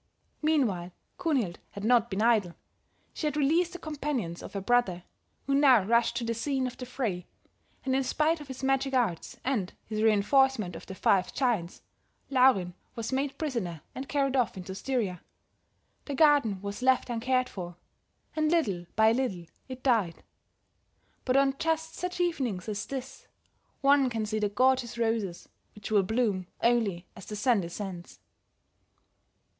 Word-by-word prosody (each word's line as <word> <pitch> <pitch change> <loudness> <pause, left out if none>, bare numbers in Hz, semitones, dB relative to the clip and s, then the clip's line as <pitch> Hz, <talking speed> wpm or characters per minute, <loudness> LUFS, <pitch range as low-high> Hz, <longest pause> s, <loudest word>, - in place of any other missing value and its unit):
Meanwhile 225 - +1 0.3
Kunhild 250 - 0
had 200 - -7
not 235 0 +4
been 195 +3 -1
idle; 215 -7 +3 0.6
she 310 - -2
had 300 0 -2
released 325 +5 +2
the - - -5
companions 285 - -3
of - - -9
her 200 - -2
brother, 195 -4 +1 0.4
who 275 - 0
now 270 -6 +6
rushed 235 +3 +2
to 240 - -2
the 230 0 -1
scene 265 +3 -1
of 255 - -4
the 250 - -8
fray, 220 -9 -3 0.6
and 260 -1 +1
in 270 - +2
spite 310 +4 +1
of 295 - -10
his 265 -1 -8
magic 270 0 +1
arts, 220 -10 -1
and 220 -8 -1
his 215 0 -3
reinforcement 220 -2 +3
of - - -10
the 190 - -7
five 185 -1 +2
giants, 230 -10 -1 0.5
Laurin 250 -9 +4 0.2
was 230 +1 -4
made 275 +1 -1
prisoner 225 - -3
and 265 +1 -7
carried 275 -2 +1
off 245 -6 +1
into 185 +1 -6
Styria. 200 -4 -2 0.8
The 285 - -4
garden 275 - +4
was 200 +3 -5
left 260 -1 +2
uncared 255 +2 +1
for, 175 -5 -7 0.6
and 310 -1 +2
little 205 - 0
by 220 +1 +5
little 230 -8 -1 0.2
it 255 0 -8
died; 220 -10 +1 1.0
but 255 +1 +3
on 275 0 +3
just 325 0 -1
such 360 0 -4
evenings 260 - -1
as 215 0 -3
this, 265 0 -7 0.5
one 275 -1 +5
can 225 -2 -2
see 215 +1 -2
the 210 -1 +1
gorgeous 255 +2 +2
roses, 225 -6 -1 0.3
which 210 +1 -8
will 210 -2 +5
bloom 200 -3 0 0.2
only 220 -7 +2
as 185 - -11
the 210 - -5
sun 220 0 +2
descends." 175 - -7
240 Hz, 160 wpm, -29 LUFS, 200-270 Hz, 1.0 s, now